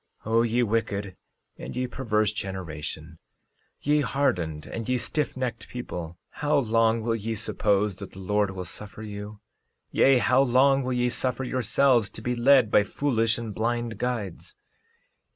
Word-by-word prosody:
13:29 110 - -4
O 115 - +5
ye 120 +1 +2
wicked 100 -4 -1 0.4
and - - -7
ye 125 0 0
perverse 110 -4 0
generation; 85 -4 -6 0.6
ye 150 +1 +2
hardened 90 - -1
and 115 +1 -6
ye 125 - +2
stiffnecked 130 -1 -2
people, 90 -9 -6 0.2
how 150 0 +3
long 115 -3 +2
will 115 0 0
ye 115 +1 -3
suppose 105 -2 0
that 100 -2 -9
the 95 - -10
Lord 105 +1 +1
will 95 -1 -6
suffer 105 +4 -9
you? 105 0 -8 0.5
Yea, 135 -1 +5
how 125 +2 +4
long 135 +1 +4
will 130 0 -2
ye 125 0 +1
suffer 130 +1 -1
yourselves 125 -1 +2
to 110 - -11
be 125 - 0
led 125 -2 +5
by - - +6
foolish 115 +1 0
and 115 -3 -5
blind 120 +1 -2
guides? 115 -8 -3
115 Hz, 155 wpm, -26 LUFS, 100-125 Hz, 0.6 s, by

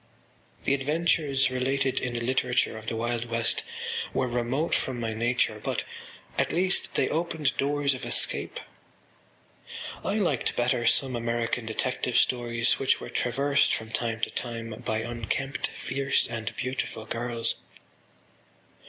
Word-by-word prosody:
The - - +2
adventures 140 -1 +2
related 130 +1 +1
in 125 -2 -2
the 120 - -2
literature 125 -1 +1
of 110 0 -9
the 115 - -1
Wild 120 +1 -1
West 115 -1 +1 0.5
were 130 - +2
remote 125 +6 0
from 130 -2 0
my 115 -1 -1
nature 120 +2 +1
but, - - -1 0.6
at - - +2
least, 185 +2 +2
they - - +3
opened 160 -3 0
doors 140 0 +2
of 130 - -6
escape. - - +1 1.4
I 200 - 0
liked 175 - +1
better 120 -1 +2
some 130 0 +2
American 115 0 -1
detective 125 +2 0
stories 120 -1 +3
which 135 - +3
were - - -7
traversed 140 +3 +2
from 110 0 -6
time 115 -1 -1
to - - 0
time 115 -1 -4
by 110 -2 0
unkempt 120 +4 -2
fierce 135 +2 0
and 110 -2 -4
beautiful 125 -3 -3
girls. 115 +1 0
125 Hz, 135 wpm, -28 LUFS, 115-135 Hz, 1.4 s, they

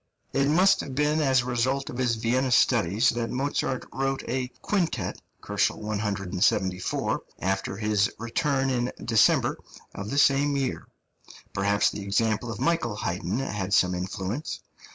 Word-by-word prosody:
It 140 0 +2
must 185 +6 +4
have 135 - -7
been 150 +2 +2
as 130 -3 +3
a - - -7
result 130 +3 0
of 120 - -7
his 120 -3 +2
Vienna 125 +4 0
studies 115 -2 +3
that 115 -1 -1
Mozart 130 -1 -1
wrote 135 0 -1
a 130 0 -1 0.2
quintet 185 -5 -1 0.3
(174 100 -3 0
K.) - - -26
after 95 +1 -2
his 105 -1 +1
return 135 +4 0
in 125 0 0
December 115 -3 +3 0.3
of 100 - -6
the 140 - -2
same 140 0 +4
year; 135 -2 -2 0.7
perhaps 100 +1 +2
the 105 - -6
example 110 +3 0
of 105 - -7
Michael 165 -11 0
Haydn 90 +1 -2
had 105 -7 -1
some 90 0 +3
influence. 95 - -4
120 Hz, 145 wpm, -26 LUFS, 100-135 Hz, 0.7 s, must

